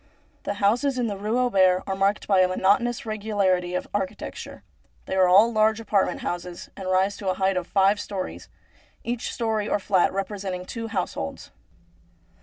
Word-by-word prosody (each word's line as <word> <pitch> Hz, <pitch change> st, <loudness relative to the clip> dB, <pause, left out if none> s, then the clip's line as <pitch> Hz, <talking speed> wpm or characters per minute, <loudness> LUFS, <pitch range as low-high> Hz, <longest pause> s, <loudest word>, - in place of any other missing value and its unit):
The 200 Hz, -, -2 dB
houses 240 Hz, +7 st, +1 dB
in 245 Hz, -, 0 dB
the 210 Hz, -3 st, -2 dB
Rue 210 Hz, +4 st, -2 dB
Auber 190 Hz, -7 st, +3 dB
are 195 Hz, -, -2 dB
marked 195 Hz, +2 st, 0 dB
by 195 Hz, -2 st, +4 dB
a 185 Hz, -, +5 dB
monotonous 205 Hz, +7 st, +1 dB
regularity 200 Hz, -5 st, 0 dB
of -, -, -3 dB
architecture. 195 Hz, -2 st, -5 dB, 0.4 s
They -, -, -5 dB
are 185 Hz, -1 st, +5 dB
all 205 Hz, +6 st, +6 dB
large 215 Hz, 0 st, +3 dB
apartment 210 Hz, -3 st, 0 dB
houses 175 Hz, 0 st, -5 dB
and 190 Hz, -2 st, -5 dB
rise 190 Hz, +2 st, +2 dB
to 195 Hz, -, -3 dB
a 185 Hz, -, 0 dB
height 190 Hz, 0 st, +1 dB
of 180 Hz, -1 st, -2 dB
five 200 Hz, +1 st, +3 dB
storeys, 195 Hz, -3 st, -6 dB, 0.5 s
each 240 Hz, 0 st, -3 dB
storey 220 Hz, -3 st, -1 dB
or -, -, +2 dB
fiat 190 Hz, -2 st, +2 dB
representing 190 Hz, -2 st, -4 dB
two 230 Hz, +3 st, -5 dB
households. 180 Hz, -, -4 dB
200 Hz, 170 wpm, -25 LUFS, 185-215 Hz, 0.5 s, all